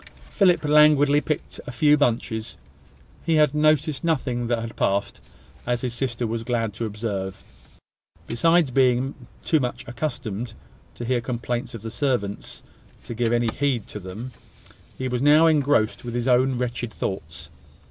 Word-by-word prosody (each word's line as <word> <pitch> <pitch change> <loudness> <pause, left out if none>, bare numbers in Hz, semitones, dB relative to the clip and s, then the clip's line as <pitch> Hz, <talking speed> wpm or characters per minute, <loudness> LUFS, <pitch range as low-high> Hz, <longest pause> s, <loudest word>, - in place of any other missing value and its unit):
Philip 180 -6 +3
languidly 150 -1 +5
picked 155 -1 -4
a - - -4
few 145 +5 +4
bunches. 115 -5 -1 0.7
He 165 0 +1
had 150 -2 +4
noticed 150 -1 +2
nothing 130 -7 0
that 120 0 +1
had 115 0 -6
passed, 100 +1 -1 0.5
as 120 0 0
his 125 -2 -3
sister 120 -1 -2
was 115 0 -2
glad 115 -3 -1
to 115 +3 -4
observe. 100 -3 -4 0.8
Besides 165 +5 +2
being 130 +1 +2 0.3
too 160 - +2
much 125 0 -4
accustomed, 120 -4 -4 0.4
to 120 - -6
hear 125 0 0
complaints 120 0 -3
of 110 - -9
the 115 - -5
servants 120 -9 -2 0.4
to - - -6
give 115 0 0
any 120 -1 +2
heed 130 -2 -1
to 105 - -6
them, 105 +7 -8 0.7
he 130 - -3
was 125 -1 -2
now 150 +3 +6
engrossed 145 -8 +2
with 120 -1 -5
his 120 +1 -1
own 130 +1 +3
wretched 120 -1 -3
thoughts. 85 -6 -5
120 Hz, 155 wpm, -24 LUFS, 115-145 Hz, 0.8 s, now